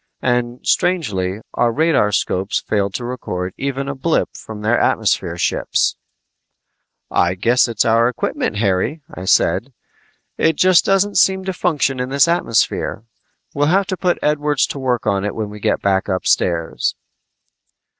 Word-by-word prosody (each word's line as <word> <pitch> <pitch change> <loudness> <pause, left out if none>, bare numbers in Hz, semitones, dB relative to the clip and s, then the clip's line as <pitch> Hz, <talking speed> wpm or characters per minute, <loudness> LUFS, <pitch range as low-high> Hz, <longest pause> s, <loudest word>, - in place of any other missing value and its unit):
And 120 0 -1
strangely, 105 - 0
our 120 - +2
radarscopes 105 - +1
failed 100 -2 -2
to 120 - -4
record 90 -7 -4
even 135 0 -3
a 140 - -2
blip 155 +5 -1
from 105 -1 -9
their 115 +3 +2
atmosphere - - 0
ships! - - 0 1.2
"I 90 +1 +2
guess 120 +8 +3
it's 115 -3 0
our 115 +1 +3
equipment, 120 - -2
Harry," 105 - 0
I 90 - -7
said. - - +2 0.7
"It 160 - +3
just 185 +1 +4
doesn't 195 0 +2
seem 190 +1 +2
to 190 - -2
function 145 -7 0
in 125 0 -2
this 140 +4 +3
atmosphere. 165 - 0 0.5
We'll 145 +1 +1
have 195 +5 +3
to 185 - -3
put 180 -1 0
Edwards 150 -1 +1
to 140 - -5
work 125 -3 -1
on 100 -1 0
it 105 - -3
when 110 -2 -4
we 105 - -9
go - - +1
back 95 -1 0
upstairs." 90 -3 0
125 Hz, 150 wpm, -19 LUFS, 105-150 Hz, 1.2 s, just